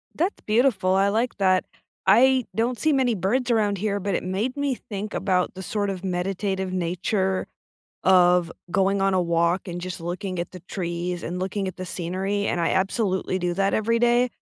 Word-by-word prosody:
That's 360 +5 -1
beautiful, 215 -5 +2
I 195 +1 +3
like 225 +3 0
that. 185 -2 +3 0.4
I 255 +5 +5
don't 235 +2 0
see 315 -1 +2
many 255 -4 +2
birds 235 +7 0
around 210 -3 +2
here, 205 +1 -1
but 195 -1 -1
it - - -2
made 200 +8 -2
me 285 -2 0
think 210 -2 -6
about 185 -2 0
the 190 - -7
sort 205 +1 -2
of 190 -1 -5
meditative 190 +1 -2
nature 185 +2 -1 0.6
of 180 -2 +5 0.2
going 195 +2 +2
on 195 0 +2
a 185 - +3
walk 170 +2 +1
and 175 0 -5
just 180 0 -5
looking 180 +2 -4
at 170 - -4
the 185 - -9
trees 175 -1 -4
and 180 +2 -4
looking 190 +1 -2
at 185 - -6
the 185 - -5
scenery, 190 +4 -2
and 175 - 0
I 165 - +1
absolutely 190 -1 0
do 175 -1 -1
that 195 +1 +1
every 230 +2 +1
day. 240 +1 +3
190 Hz, 190 wpm, -24 LUFS, 180-215 Hz, 0.6 s, I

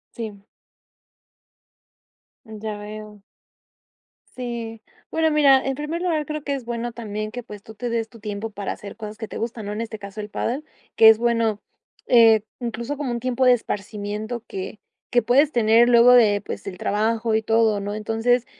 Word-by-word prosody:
Sí. 210 -4 -7 2.0
Ya 215 -2 -6
veo. 210 0 -9 1.1
Sí, 235 -3 -5 0.3
bueno, 320 0 +2
mira, 280 -3 +5
en 270 0 -1
primer 300 +4 -4
lugar, 325 -4 0
creo 305 0 -5
que 285 -1 -1
es 260 -3 -7
bueno 235 0 -3
también 215 -2 -5
que, 245 - -5
pues, 210 -4 -11
tú 220 - -12
te 240 +3 -4
des 230 -1 -2
tu 230 - -15
tiempo 210 +1 -5
para 200 -2 -4
hacer 205 0 -10
cosas 215 -1 -7
que 220 -2 -6
te - - -6
gustan, 230 -2 -4
¿no?, 205 - -4
en 210 - -4
este 225 -1 -5
caso, 200 0 -9
el 210 0 -5
pádel, 260 +8 -3 0.3
que 225 - +8
es 220 0 +8
bueno, 230 -2 +1 0.5
eh, 225 -3 +6 0.2
incluso 235 +3 -4
como 275 -3 -3
un 235 0 -3
tiempo 255 +1 0
de 250 - +7
esparcimiento 215 +1 -4
que 190 +2 -6 0.3
que 240 - +4
puedes 275 +6 +3
tener 230 0 +5
luego 240 0 +7
de, 215 -5 +5
pues, - - -7
el 185 -2 -6
trabajo 220 +3 0
y 220 - +2
todo, 225 -1 +2
¿no?, 200 +1 -4
entonces, 225 +3 +1
225 Hz, 180 wpm, -23 LUFS, 215-245 Hz, 2.0 s, que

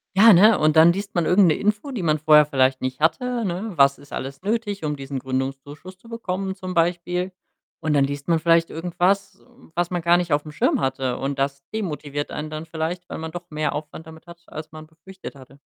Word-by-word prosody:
Ja, 220 +3 +8
ne, 205 +4 +6
und 155 +1 +3
dann 165 +2 +7
liest 200 0 -6
man 175 - +1
irgend 185 +1 +5
'ne 155 - +3
Info, 210 +6 -1
die 225 -9 -4
man 155 -2 +1
vorher 150 -1 +6
vielleicht 130 -2 +1
nicht 130 +1 -3
hatte, 235 +10 0
ne? 190 +3 -3
Was 140 0 +5
ist 140 0 -15
alles 135 +3 -6
nötig, 205 -3 -2
um 150 - -1
diesen 135 -1 -6
Gründungszuschuss 135 +7 -5
zu 230 - -20
bekommen 195 -4 -4
zum 185 -1 -7
Beispiel? 175 +2 0 0.5
Und 155 -2 -1
dann 140 -2 +4
liest 140 0 -6
man 170 -1 +3
vielleicht 165 0 +3
irgendwas, 180 +4 -1
hm, 245 -7 -22
was 175 +1 -1
man 175 -2 -3
gar 170 +1 +5
nicht 175 -2 -2
aufm 145 +1 0
Schirm - - +1
hatte 130 -1 -1
und 135 0 -3
das 140 0 -2
demotiviert 150 -8 -4
einen 155 +1 -6
dann 155 +1 -6
vielleicht, 165 +2 -4
weil - - -5
man 160 0 -6
doch 175 +1 -8
mehr 155 0 -2
Aufwand 150 +1 -7
damit 160 +1 -14
hat, 170 0 -14
als 155 +1 -9
man 155 0 -10
befürchtet 170 +4 -12
hatte. 135 0 -16
160 Hz, 220 wpm, -23 LUFS, 145-185 Hz, 0.5 s, Ja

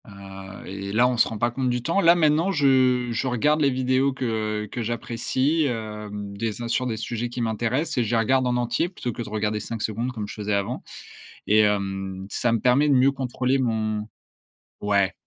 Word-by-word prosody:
Heu, 95 -1 -10
et 100 +1 -6
là, 120 +4 +4
on 125 -1 -1
se - - +4
rend 110 - -5
pas 120 +3 +1
compte 130 +1 -1
du 120 -1 -1
temps. 170 +8 +1
Là, 170 -1 +6
maintenant 160 +2 +3
je 130 -5 +3
je 115 +3 -1
regarde 150 +5 +2
les 140 - +4
vidéos 130 +1 +1
que, 130 0 -4 0.4
heu, - - -7
que 120 - -5
j'apprécie, 120 +6 0
hem, 105 -4 -5
des 110 +2 -3
un - - -3
sur 125 +2 0
des 115 -3 -2
sujets 120 +2 -3
qui 120 +1 -5
m'intéressent, 120 +7 -1
et - - +3
je 110 - -3
les - - +4
regarde 130 +3 +2
en 125 - +1
entier 120 +8 0
plutôt 125 -9 -4
que - - -6
de 110 - -6
regarder 105 0 -1
5 115 +1 -5
secondes 115 +4 -2
comme 110 -4 -5
je - - -7
faisais 105 -1 -3
avant 100 -1 -2 0.6
et 110 +1 +5
hem, 95 -2 -1
ça 120 - +1
me 115 - +1
permet 125 +6 +3
de - - +5
mieux 130 +2 +5
contrôler 130 0 -1
mon 110 -3 -1 0.7
ouais. 100 -2 +2
120 Hz, 215 wpm, -24 LUFS, 105-130 Hz, 0.7 s, Là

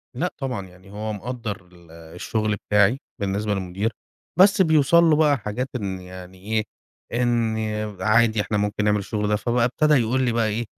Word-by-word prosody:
لأ 180 +2 -2
طبعًا. 125 -9 -4
يعني 95 +2 -17
هو 105 +1 -4
مقدّر 105 -4 -6
ال 85 -2 -18
الشُغل 90 +6 -3
بتاعي 105 +5 +4 0.2
بالنسبة 100 +1 -1
للمدير، 95 +3 -2 0.5
بس 195 +1 +6
بيوصل 160 0 +5
له 160 -2 +5
بقى 150 -3 +3
حاجات 110 +5 -4
إن 95 -5 -3
يعني 90 0 -11
إيه، 110 +3 -1 0.6
إن 115 -2 +1 0.4
عادي 110 +1 +3
إحنا 105 0 -2
ممكن 105 +1 -1
نعمل 105 0 +2
الشُغل 105 +1 -2
ده. 105 - +2
فبقى 120 +2 +1
ابتدى 150 +4 +2
يقول 130 0 +2
لي 120 - +1
بقى 115 -1 +1
إيه: 110 +2 -2
110 Hz, 170 wpm, -23 LUFS, 100-125 Hz, 0.6 s, بس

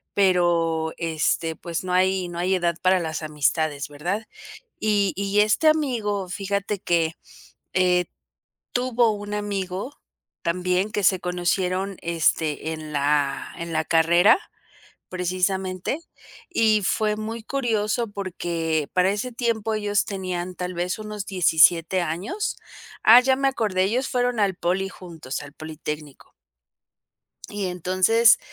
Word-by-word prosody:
pero, 170 -4 +2
este, 160 0 0
pues, 170 +1 -5
no 180 -1 -3
hay 185 0 +2
no 175 0 -6
hay 185 +2 +1
edad 175 -2 0
para 185 0 +4
las 160 -1 -3
amistades, 150 -1 0
¿verdad?, 175 +9 -3 0.6
y 205 -3 +2
y 200 +1 +2
este 215 +10 +3
amigo, 225 -11 +1
fíjate 200 +2 -2
que, 165 -2 0 0.6
eh, 180 -1 +3 0.7
tuvo 245 -2 +2
un 205 0 -5
amigo 200 +3 -3 0.5
también, 180 +3 0
que 205 - -1
se 185 0 +4
conocieron, 185 +2 -1
este, 160 -2 0
en 155 -1 -7
la 145 -1 0
en 170 0 -5
la 160 0 0
carrera 170 - +5 0.7
precisamente, 185 - -1 0.5
y 220 - +3
fue 210 +2 +1
muy 220 +1 -5
curioso, 230 -3 -1
porque 170 -6 -2
para 185 +1 +3
ese 220 +5 -3
tiempo 230 -2 -1
ellos 205 -1 0
tenían 185 -3 -4
tal 180 0 -4
vez 175 +1 -2
unos 210 -2 -6
17 175 -1 +4
años, 180 - -3 0.5
ah, 230 +3 +9
ya 265 +1 +3
me 275 +1 +1
acordé, 210 -8 0
ellos 245 +7 0
fueron 245 -3 0
al 195 -3 +2
poli 190 +3 -1
juntos, 165 -9 -7
al 140 - -12
Politécnico. 150 -2 -7 1.2
Y 205 -2 -3
entonces, 185 +6 +4
185 Hz, 130 wpm, -24 LUFS, 170-210 Hz, 1.2 s, ah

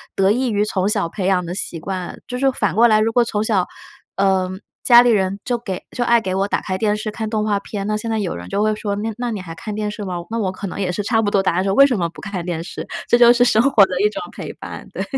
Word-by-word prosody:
得 195 +1 +3
益 250 +2 +1
于 210 0 +1
从 190 -2 0
小 200 -5 0
培 195 0 -4
养 180 -2 +2
的 175 - -5
习 170 -4 -3
惯。 185 0 -5
就 250 - -4
是 270 +1 +2
反 205 -8 -1
过 235 +2 +6
来， 215 -1 +4
如 225 +1 +1
果 240 +1 +3
从 215 -2 -1
小， 200 -5 +1 0.5
呃， 190 -1 +2 0.3
家 240 -1 +8
里 245 - +3
人 195 -1 +1
就 245 - 0
给 195 -6 -5
就 245 - 0
爱 235 0 +4
给 185 -2 -3
我 195 +1 +1
打 - - -1
开 185 0 -3
电 210 0 +1
视 215 0 -4
看 220 0 -4
动 215 -1 -1
画 205 -2 +1
片， 200 -1 -5
那 215 - 0
现 225 +2 -5
在 220 - 0
有 195 -4 -2
人 90 +1 -8
就 205 - -1
会 215 0 +1
说， 205 -1 -3
那 220 +2 -2
那 245 -1 -2
你 210 - -4
还 165 -3 -8
看 210 +6 -6
电 210 0 -2
视 210 0 -7
吗？ 185 -2 -4 0.2
那 230 - -2
我 190 -4 0
可 195 +2 -6
能 180 - -6
也 180 - 0
是 195 - -2
差 225 +1 +2
不 205 - 0
多 195 - +3
答 180 - +1
案， 185 - +1
说： 195 0 0
“为 275 - +8
什 245 - 0
么 170 -3 0
不 - - -13
看 195 -4 -5
电 170 -2 -3
视？” 175 - -7 0.2
这 240 - +4
就 240 0 +7
是 245 0 +3
生 225 -2 +4
活 255 -7 +6
的 180 0 -3
一 210 - +4
种 - - -6
陪 - - -7
伴。 - - -9
对。 - - -3
210 Hz, 330 characters per minute, -20 LUFS, 190-225 Hz, 0.5 s, 家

